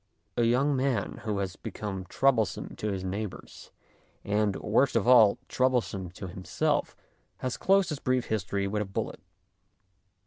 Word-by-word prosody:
A 120 - +2
young 135 +5 +3
man 130 -2 -1
who 105 -2 -1
has 95 -2 -2
become 95 -3 -5
troublesome 115 0 +1
to 105 - -2
his 95 -1 -3
neighbours, 100 +2 -6 0.5
and, 105 -1 +1
worst 120 +6 +2
of 115 0 +2
all, 115 -5 +7
troublesome 125 -8 0
to 95 - -7
himself, 90 +1 -1 0.4
has 130 -1 -3
closed 195 -1 +3
his 150 -3 -3
brief 130 -1 0
history 100 -2 -1
with 105 +1 -1
a - - -1
bullet. 95 - -4
110 Hz, 145 wpm, -28 LUFS, 100-130 Hz, 0.5 s, all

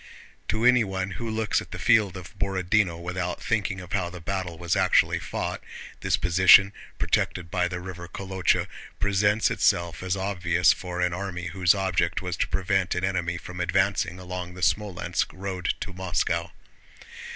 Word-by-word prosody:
To 110 +3 0
anyone 100 -6 +3
who 115 +4 -5
looks 110 -1 0
at - - -11
the - - -7
field 105 -4 +3
of 90 +3 -10
Borodinó 95 -2 +1
without 90 0 -3
thinking 105 -4 -1
of 90 0 -9
how 85 - 0
the 90 0 -9
battle 90 -1 -4
was 85 0 -1
actually - - +3
fought, - - -4 0.4
this - - +1
position, 95 +3 +6 0.2
protected 85 -2 -1
by 90 - +1
the 90 0 -4
river 90 -1 -8
Kolochá, 95 0 0 0.3
presents 100 +2 +2
itself 85 -1 +1
as 95 +1 -1
obvious 90 -3 +2
for 90 -1 -5
an 90 -1 +1
army 90 -1 -4
whose 90 -1 +3
object 90 -3 0
was 90 -1 -4
to - - 0
prevent 95 -1 0
an 90 - -2
enemy 90 -2 -1
from 90 +1 -9
advancing 90 0 +1
along 90 -1 -6
the 90 - -9
Smolénsk 95 -2 0
road 95 -2 -3
to 95 - -5
Moscow. 85 -2 -1
90 Hz, 160 wpm, -26 LUFS, 90-100 Hz, 0.4 s, position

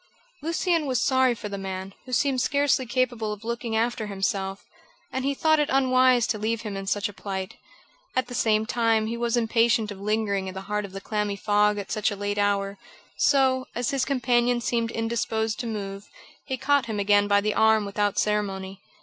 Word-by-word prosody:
Lucian 330 0 0
was 255 -3 +1
sorry 260 -2 +3
for 210 - -6
the 200 -1 -5
man, 190 0 -5
who - - -8
seemed 260 +1 +1
scarcely 280 -2 +1
capable 240 -3 0
of 210 0 -7
looking 235 0 -3
after 225 -1 0
himself, 195 -1 -2 0.5
and 260 - -2
he 280 +1 0
thought 315 +2 +3
it 295 - +1
unwise 255 -2 +4
to 215 0 -2
leave 220 +1 -1
him 210 -3 -5
in 195 0 -5
such 205 +1 0
a 205 - -10
plight. 190 -2 -5 0.6
At 255 - +1
the 245 - -9
same 220 -3 +2
time, 225 -1 +1
he 230 +2 -3
was 235 0 0
impatient 230 -1 +2
of 195 -1 -9
lingering 205 -2 0
in 185 - -6
the 190 - -5
heart 210 +1 -2
of 195 - -10
the 195 - -6
clammy 210 -1 -2
fog 210 +1 +2
at 200 -1 -6
such 215 -1 +1
a 205 - -4
late 205 +1 -2
hour; 200 -1 0 0.4
so, 260 -2 +3
as 240 0 -1
his 275 -2 0
companion 245 -2 +2
seemed 235 -1 -1
indisposed 225 -1 -1
to 240 - -3
move, 200 -2 -5 0.4
he 260 - -2
caught 275 -1 +2
him 215 -2 -3
again 205 0 +3
by 200 0 +4
the 210 +1 0
arm 220 -1 +4
without 205 0 -1
ceremony. 195 -2 -1
220 Hz, 200 wpm, -25 LUFS, 205-245 Hz, 0.6 s, unwise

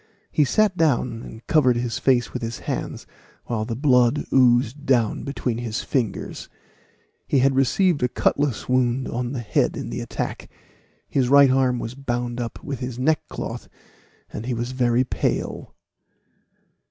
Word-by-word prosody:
He 150 - +3
sat 210 +7 +2
down 130 -8 +1
and 110 0 -11
covered 130 -6 +3
his 120 0 -2
face 125 -3 +2
with - - -4
his 115 0 -4
hands, - - -4 0.4
while 110 -2 -2
the 115 - -3
blood 125 0 +3
oozed 125 +1 +3
down 120 -6 +1
between 125 -4 -3
his 115 -2 -3
fingers. 120 -8 -3 0.8
He - - +2
had 135 +1 +4
received 145 +5 +2
a 125 - +3
cutlass 140 -1 0
wound 130 0 +1
on 120 0 -3
the 125 - -3
head 110 - 0
in - - -5
the - - -4
attack. - - -5 0.6
His 130 -3 +1
right 140 -1 +7
arm 130 -1 +2
was 115 0 -5
bound 120 -2 -3
up 115 - -6
with 140 -3 -5
his 125 -2 -5
neckcloth, 150 +5 -2 0.6
and 115 - -5
he 125 - -1
was 120 +2 -3
very 125 -1 +2
pale. 130 - -3
125 Hz, 155 wpm, -23 LUFS, 120-135 Hz, 0.8 s, right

